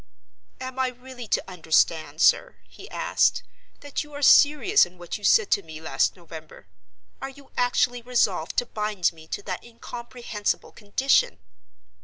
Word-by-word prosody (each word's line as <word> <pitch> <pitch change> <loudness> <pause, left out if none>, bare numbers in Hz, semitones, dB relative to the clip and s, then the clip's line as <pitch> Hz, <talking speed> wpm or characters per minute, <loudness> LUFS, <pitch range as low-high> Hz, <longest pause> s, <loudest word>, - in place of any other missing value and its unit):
"Am 260 0 -6
I 260 - +2
really 250 -1 -9
to - - 0
understand, 160 -2 0
sir," - - +4
he - - -13
asked, - - +1 0.4
"that 285 +1 -4
you 295 0 -16
are 285 0 -6
serious 300 +10 +6
in 180 - -5
what 175 +3 -6
you - - -20
said 435 - +4
to - - +3
me 160 -3 -10
last 160 - 0
November? 160 - -12 0.6
Are 270 - -4
you 275 0 -16
actually 245 0 +1
resolved 220 -9 0
to 245 - +2
bind 210 -6 -1
me 160 -1 -16
to 205 - -5
that 185 -3 -5
incomprehensible 235 -2 -5
condition?" 235 +6 +1
235 Hz, 155 wpm, -25 LUFS, 180-260 Hz, 0.6 s, serious